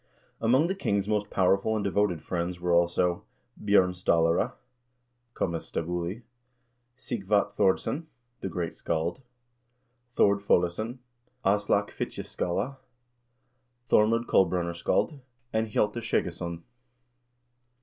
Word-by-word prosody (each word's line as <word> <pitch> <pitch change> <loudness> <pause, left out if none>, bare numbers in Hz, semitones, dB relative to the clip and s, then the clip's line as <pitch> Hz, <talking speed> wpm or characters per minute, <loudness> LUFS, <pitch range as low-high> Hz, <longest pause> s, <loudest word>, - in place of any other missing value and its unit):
Among 125 +7 +4
the 185 - 0
king's 100 - -1
most 105 -1 0
powerful 95 +3 +2
and 105 - -1
devoted 100 -5 +1
friends 85 +1 -3
were 90 0 0
also: 85 +1 +2 0.4
Bj0rn 100 -3 +4
Stallare 85 -2 +2 0.8
{comes 85 -2 -3
stabuli), 90 +6 -3 0.7
Sighvat 105 -5 0
Thordsson 105 - +1 0.3
the 95 - -4
great 85 -1 -3
scald, 85 +8 -2 0.9
Thord 100 0 +4
Foleson, 100 +5 +1 0.5
Aslak 100 +1 +2
Fitjaskalle, 125 +10 -3 1.1
Thormod 115 +2 +3
Kolbrunarskald, 90 - +1 0.3
and 110 0 +1
Hjalte 105 +2 0
Skjeggesson. 85 -6 -2
95 Hz, 95 wpm, -28 LUFS, 85-110 Hz, 1.1 s, Among